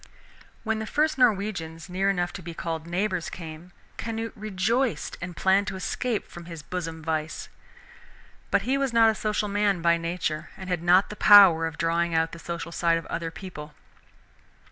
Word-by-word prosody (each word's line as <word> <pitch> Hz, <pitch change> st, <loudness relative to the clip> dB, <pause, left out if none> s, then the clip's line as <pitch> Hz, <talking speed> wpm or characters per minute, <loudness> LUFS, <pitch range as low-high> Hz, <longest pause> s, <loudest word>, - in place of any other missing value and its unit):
When 220 Hz, -1 st, -1 dB
the 220 Hz, -, -4 dB
first 305 Hz, +1 st, +1 dB
Norwegians 195 Hz, -8 st, 0 dB
near 190 Hz, +2 st, 0 dB
enough 175 Hz, -2 st, -1 dB
to 195 Hz, -, -7 dB
be 170 Hz, -1 st, -8 dB
called 165 Hz, -1 st, -4 dB
neighbors 185 Hz, 0 st, -1 dB
came, 165 Hz, 0 st, -9 dB, 0.3 s
Canute 225 Hz, 0 st, -4 dB
rejoiced, 215 Hz, +4 st, -1 dB
and 175 Hz, 0 st, -6 dB
planned 195 Hz, +2 st, +3 dB
to 195 Hz, -, -3 dB
escape 215 Hz, +4 st, -2 dB
from 175 Hz, -1 st, -11 dB
his 165 Hz, -3 st, -9 dB
bosom 165 Hz, -2 st, -5 dB
vice. 155 Hz, -1 st, -3 dB, 1.0 s
But 195 Hz, -, +2 dB
he 265 Hz, +5 st, 0 dB
was 270 Hz, -3 st, -1 dB
not 225 Hz, -1 st, +6 dB
a -, -, -3 dB
social 210 Hz, 0 st, -1 dB
man 205 Hz, -2 st, +1 dB
by 170 Hz, 0 st, +4 dB
nature 165 Hz, -2 st, -3 dB
and 190 Hz, -2 st, -7 dB
had 175 Hz, -2 st, 0 dB
not 180 Hz, +4 st, +4 dB
the -, -, -6 dB
power 190 Hz, -7 st, +7 dB
of 155 Hz, -2 st, -8 dB
drawing 170 Hz, 0 st, 0 dB
out 160 Hz, 0 st, +1 dB
the 165 Hz, -, -9 dB
social 170 Hz, 0 st, -5 dB
side 170 Hz, -1 st, +2 dB
of 165 Hz, -, -6 dB
other 165 Hz, -1 st, -3 dB
people. 155 Hz, -3 st, -9 dB
180 Hz, 180 wpm, -26 LUFS, 165-210 Hz, 1.0 s, power